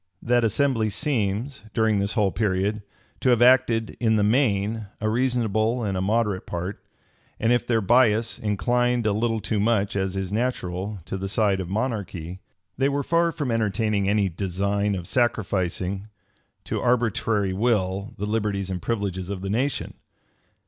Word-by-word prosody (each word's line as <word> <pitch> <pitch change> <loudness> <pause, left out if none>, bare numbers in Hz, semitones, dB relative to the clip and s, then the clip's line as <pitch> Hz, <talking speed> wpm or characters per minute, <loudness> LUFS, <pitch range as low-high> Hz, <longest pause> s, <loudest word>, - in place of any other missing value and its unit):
That 120 0 +2
assembly 115 0 +1
seems, 115 0 -2
during 110 -3 +2
this 100 +2 -1
whole 105 -5 +2
period, 105 +1 0 0.4
to 130 - +1
have 120 -2 +4
acted, 120 -3 +4
in 110 -2 +2
the 105 - +2
main, 110 -2 +1
a 110 - -1
reasonable 115 -1 +1
and 100 -3 -1
a 90 - -1
moderate 105 -1 0
part; 90 +3 -5 0.6
and 115 +2 +3
if 120 0 0
their 115 -2 +2
bias 115 +1 +3
inclined 120 +3 +1
a 105 - +2
little 115 +1 0
too 105 0 -1
much, 105 -2 +1
as 95 -1 -1
is 95 -1 -3
natural, 105 -4 -2
to 95 - -4
the 95 0 -3
side 100 -2 +2
of 90 -2 -4
monarchy, 95 -6 -3 0.4
they 135 +1 +3
were 140 0 -1
far 170 +3 +2
from 145 -6 -3
entertaining 105 -2 0
any 100 -1 +2
design 100 +3 -1
of 90 -2 -5
sacrificing 95 -4 -1 0.6
to - - -3
arbitrary 115 -5 +1
will 100 -2 0
the 105 - -3
liberties 105 -3 -1
and 90 -1 -3
privileges 100 -5 -2
of 100 -2 -4
the 95 0 -3
nation. 130 +6 -1
105 Hz, 160 wpm, -24 LUFS, 100-120 Hz, 0.6 s, have